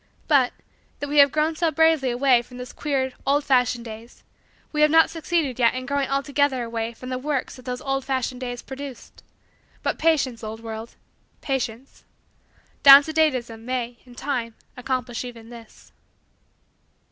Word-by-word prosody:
But, 270 -5 +4 0.5
though 290 - -4
we 290 +1 +2
have 280 -1 +7
grown 310 +2 0
so 330 +1 +1
bravely 315 -3 +3
away 245 0 +3
from 250 +1 -14
those 250 0 -8
queer, 265 -3 -2
old 285 +2 +2
fashioned 250 -3 +1
days 225 +1 -11 0.5
we 300 - -1
have 300 - +6
not 325 +1 +5
succeeded 320 -5 -1
yet 235 0 +3
in 255 0 -4
growing 280 0 -1
altogether 275 -1 +1
away 230 0 -3
from 255 +2 -9
the 255 0 -3
works 280 -1 -2
that 255 - -15
those 250 -1 -4
old 270 -1 -1
fashioned 260 -1 -2
days 245 -1 -5
produced. 270 -1 -9 0.6
But, - - -1
patience, 275 -8 +1
old 220 +1 -6
world 225 0 -8 0.5
patience 260 -2 -4 0.8
down 280 +1 +10
to 315 - -6
date 315 -3 +3
ism 230 -2 -6
may, 245 -1 -3
in 245 -1 -16
time, 240 -5 -3 0.2
accomplish 250 -2 -3
even 235 -2 -10
this. 230 -2 -14
255 Hz, 165 wpm, -23 LUFS, 240-285 Hz, 0.8 s, down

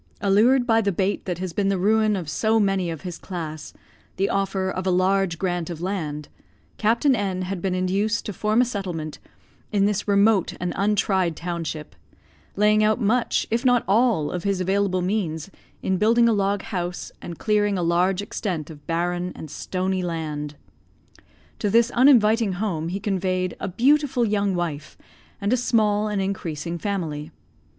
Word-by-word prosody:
Allured 225 +6 +4
by 225 -2 +3
the 200 -2 +1
bait 190 +2 -1
that 180 -3 -2
has 180 -1 -4
been 200 +1 0
the 195 - +1
ruin 215 +2 +3
of 180 -5 -4
so 220 +8 +1
many 195 -4 +1
of 160 -3 -5
his 180 -2 -6
class, 160 -5 -6 0.4
the 195 +1 0
offer 195 -1 0
of 185 0 -3
a - - +3
large 185 -1 +2
grant 175 -2 -2
of 170 -3 -6
land, 160 -5 -3 0.5
Captain 235 +6 +3
N 190 -4 -2
had 185 -1 -4
been 185 -1 -1
induced 200 +5 0
to 210 - -4
form 215 +4 +2
a - - +3
settlement 180 -9 -5 0.5
in 200 -1 +3
this 205 0 -1
remote 200 -1 +3
and 180 0 -2
untried 195 -4 +1
township; 165 -3 -5 0.6
laying 210 +1 +4
out 215 +2 +2
much, 235 +2 +1
if 230 +2 +1
not 245 -2 +4
all, 210 -7 +2
of 180 -1 -4
his 200 -2 0
available 190 0 +1
means 180 -3 -2 0.3
in 190 - +1
building 230 +4 +4
a 230 - +4
log 200 -1 0
house, 175 -1 -4
and 170 -2 -7
clearing 205 -2 +1
a 175 - -1
large 180 +3 +2
extent 170 -6 -4
of 145 -2 -14
barren 175 +2 -1
and 155 - -9
stony 185 0 -2
land. 155 -4 -4 1.0
To 210 - 0
this 230 +3 +4
uninviting 230 -5 +4
home 180 -5 -2
he 190 +3 -3
conveyed 185 -2 -1
a - - -3
beautiful 255 - +2
young 205 -2 0
wife, 165 -4 -4 0.4
and 200 +3 0
a - - +3
small 215 -3 +2
and 210 -1 -1
increasing 170 -4 -3
family. 160 -6 -3
195 Hz, 170 wpm, -23 LUFS, 175-210 Hz, 1.0 s, Allured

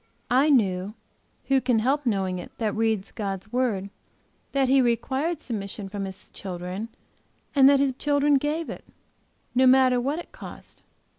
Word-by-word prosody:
I 265 +5 +4
knew 200 -6 +2 0.5
who 270 -1 +3
can 250 -2 +2
help 265 +5 +1
knowing 190 -4 0
it 175 - -9
that 215 -3 -1
reads 220 -3 0
God's 200 0 -5
word? 215 -6 0 0.6
that 275 -1 +2
he 265 +1 +5
required 265 +7 0
submission 200 -5 -5
from 200 0 -4
His 190 -1 -10
children 185 +3 -6 0.6
and 275 -2 +7
that 280 -1 +5
His 275 -1 +2
children 285 -1 +3
gave 305 +4 -2
it, - - -7 0.7
no 260 +1 +4
matter 255 -1 +5
what 280 +5 -1
it 345 - -8
cost. - - -12
245 Hz, 155 wpm, -25 LUFS, 200-275 Hz, 0.7 s, and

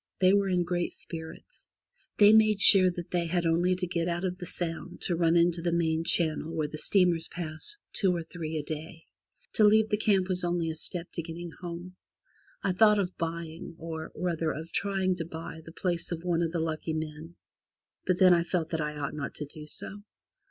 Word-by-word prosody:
They 185 0 +5
were 200 -1 +3
in 180 -1 +2
great 175 0 -2
spirits. 160 - -4 0.5
They 210 0 +7
made 215 -2 +5
sure 190 -2 +8
that 175 -1 -7
they 175 -1 0
had 175 0 0
only 175 +3 +2
to 180 0 -2
get 170 -1 -1
out 175 +1 -2
of 180 0 -3
the 180 - -6
Sound 170 +1 -5
to 175 - 0
run 165 0 +3
into 170 0 +3
the 170 0 0
main 165 -1 +1
channel 160 -1 0
where 155 -2 0
the 155 +1 -7
steamers 175 -3 +2
pass 170 - -6 0.2
two 190 -3 +2
or 170 -2 -2
three 160 -1 -5
a 150 - -2
day. 160 +2 -7 0.5
To 220 - +3
leave 215 +1 +5
that 210 - 0
camp 195 -4 +3
was 185 -1 -1
only 175 -2 0
a - - -6
step 170 +2 -1
to 170 - -3
getting 170 +1 -7
home. 175 +1 -8 0.7
I - - +2
thought 210 +3 +5
of 190 -2 -1
buying 165 0 -5
or, 160 -1 -6
rather, 165 -3 -1
of 160 +2 -7
trying 195 -2 0
to 170 - -2
buy 160 0 -8
the 165 - -11
place 175 0 0
of 170 -1 -4
one 175 -2 +1
of 165 -1 0
the 170 - -2
lucky 160 0 -2
men, 155 +1 -6 0.7
but 185 -1 +2
then 185 -1 +7
I 170 - +4
felt 170 -1 -1
that 160 -2 -1
I 150 0 -3
ought 145 -1 -3
not 145 -2 -5
to 150 - -5
do 150 +1 -10
so. 205 +6 -7
170 Hz, 215 wpm, -29 LUFS, 160-180 Hz, 0.7 s, sure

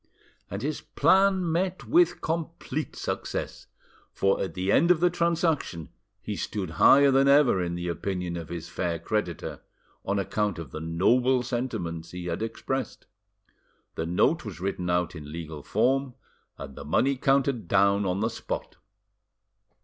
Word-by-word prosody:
And 100 +4 -5
his 150 +1 -2
plan 190 +2 +3
met 180 +2 -1
with 345 +2 +3
complete 160 -2 -3
success, - - -4 0.4
for 95 0 +1
at 85 -4 -4
the 95 +2 0
end 170 +10 +4
of 180 -3 +5
the 175 +1 +3
transaction 165 - 0 0.3
he - - -4
stood 95 -6 -4
higher 140 0 +7
than 135 +1 +4
ever 140 -9 +5
in 85 -1 -2
the 85 0 -4
opinion 90 +1 -3
of 85 -2 -6
his 85 -1 -6
fair 85 -2 -2
creditor, 90 -1 -3 0.4
on 100 +1 -1
account 100 0 -1
of 80 -6 -8
the 80 - -6
noble 120 +11 +2
sentiments 110 -10 -3
he 90 0 -7
had 85 +2 -3
expressed. 130 +4 -4 0.9
The 80 - -3
note 90 - +2
was 100 -7 -8
written 90 -1 -3
out 90 -1 +1
in 75 -2 -8
legal 80 -2 -7
form 125 - +1 0.4
and 70 -1 -9
the - - -8
money 135 - +2
counted 135 -5 +1
down 100 +2 +3
on 95 +1 -1
the 110 - +1
spot. - - -5
105 Hz, 155 wpm, -27 LUFS, 85-140 Hz, 0.9 s, higher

